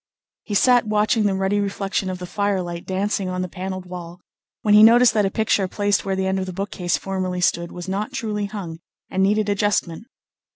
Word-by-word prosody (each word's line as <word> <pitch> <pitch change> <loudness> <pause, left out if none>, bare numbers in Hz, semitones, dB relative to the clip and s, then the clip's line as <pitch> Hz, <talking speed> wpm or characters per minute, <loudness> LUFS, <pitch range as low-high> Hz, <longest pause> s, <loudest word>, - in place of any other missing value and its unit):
He 205 - -5
sat 245 +1 +4
watching 210 +1 +2
the 195 - 0
ruddy 195 +2 0
reflection 195 -1 -2
of 185 - -4
the 180 - -7
firelight 185 -3 -2
dancing 195 0 -1
on 185 0 -2
the - - -3
panelled 185 +1 -6
wall, 175 -1 -8 0.4
when 210 - +3
he 210 - +8
noticed 235 +2 +7
that 210 -2 +2
a - - -1
picture 205 -2 +1
placed 205 +1 0
where 195 -1 -1
the 190 0 -1
end 190 0 0
of 190 - -3
the 185 - -5
bookcase 180 -2 -2
formerly 185 -2 -3
stood 170 -1 0
was 175 0 -8
not 200 +6 -2
truly 215 -6 -3
hung, 185 -6 -7 0.3
and 190 - 0
needed 210 +2 +2
adjustment. 205 -1 -1
195 Hz, 205 wpm, -22 LUFS, 185-210 Hz, 0.4 s, he